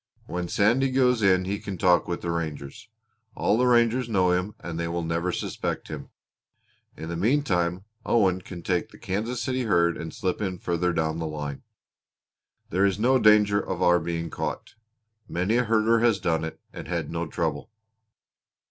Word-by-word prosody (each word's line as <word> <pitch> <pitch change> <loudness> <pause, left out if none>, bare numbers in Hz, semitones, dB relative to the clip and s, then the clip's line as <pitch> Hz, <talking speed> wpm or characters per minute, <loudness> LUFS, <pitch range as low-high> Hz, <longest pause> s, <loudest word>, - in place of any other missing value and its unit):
When 90 0 -4
Sandy 120 +9 +2
goes 125 -2 +2
in 95 -2 +3
he 100 +2 -2
can 100 -2 -6
talk 90 -2 +3
with 85 - -3
the 85 - -2
ranger. 80 -4 -4 0.6
All - - +2
the 125 +2 +2
rangers 120 0 +3
know 95 -4 +3
him 90 +4 -1
and 85 -1 -6
they 85 - -1
never 85 0 -2
will - - +1
suspect - - -4
him. - - -7 0.9
In 80 - -6
the 85 - -4
meantime 95 - +1 0.2
Owen 95 -7 +2
can 85 -2 -9
take 90 -2 -1
the - - -15
Kansas 115 +5 -3
City 130 +2 -1
herd 85 -5 +2
and 80 -1 -6
slip 95 +5 -2
in 95 -3 -2
further 90 +1 0
down 80 -1 -1
the 80 - -2
line. 75 -2 -5 1.1
There 95 +3 +2
is 100 -1 +2
no 130 +4 +3
danger 105 -2 +5
of 95 -2 -3
our 90 0 +5
being 85 0 -4
caught. - - -4 0.6
Many 90 +7 +1
a 125 - +2
herder 115 +1 +3
has 115 -3 +3
done 80 -3 0
it 80 - -6
and - - -8
had 85 -3 -3
no 85 0 -3
trouble." - - -3
90 Hz, 180 wpm, -26 LUFS, 85-110 Hz, 1.1 s, danger